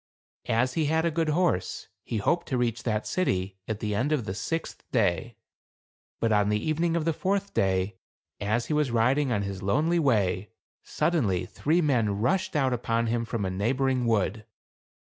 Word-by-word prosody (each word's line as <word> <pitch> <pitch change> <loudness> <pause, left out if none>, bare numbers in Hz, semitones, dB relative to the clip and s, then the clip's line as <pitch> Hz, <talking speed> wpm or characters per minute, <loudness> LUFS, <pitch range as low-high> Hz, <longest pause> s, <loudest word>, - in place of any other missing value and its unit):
As 120 +2 +2
he 160 - +1
had 160 +2 +1
a 170 - +2
good 160 0 0
horse, 155 - 0 0.2
he 115 - -3
hoped 170 - 0
to 130 - -1
reach 120 -1 0
that 110 -3 -1
city 95 - -1
at 110 -1 -3
the 105 -1 -1
end 130 +9 0
of 140 -8 0
the 95 - -3
sixth 165 +10 -4
day. 105 -1 +1 0.8
But 115 - +1
on 105 -1 +3
the 105 - +2
evening 165 +6 0
of 165 -2 0
the 165 - +2
fourth 200 +4 -1
day, 95 0 +1 0.4
as 110 +4 0
he - - -2
was 150 -3 +2
riding 125 +4 +2
on 105 -3 +1
his 100 -1 -5
lonely 155 - +2
way, 105 - +1 0.3
suddenly, 100 - 0
three 160 - +1
men 115 -10 +1
rushed 175 - 0
out 135 -3 +2
upon 115 -1 0
him 115 -1 0
from 110 -3 -2
a 95 - -1
neighboring 125 +5 0
wood. 110 -1 +1
120 Hz, 185 wpm, -27 LUFS, 105-150 Hz, 0.8 s, on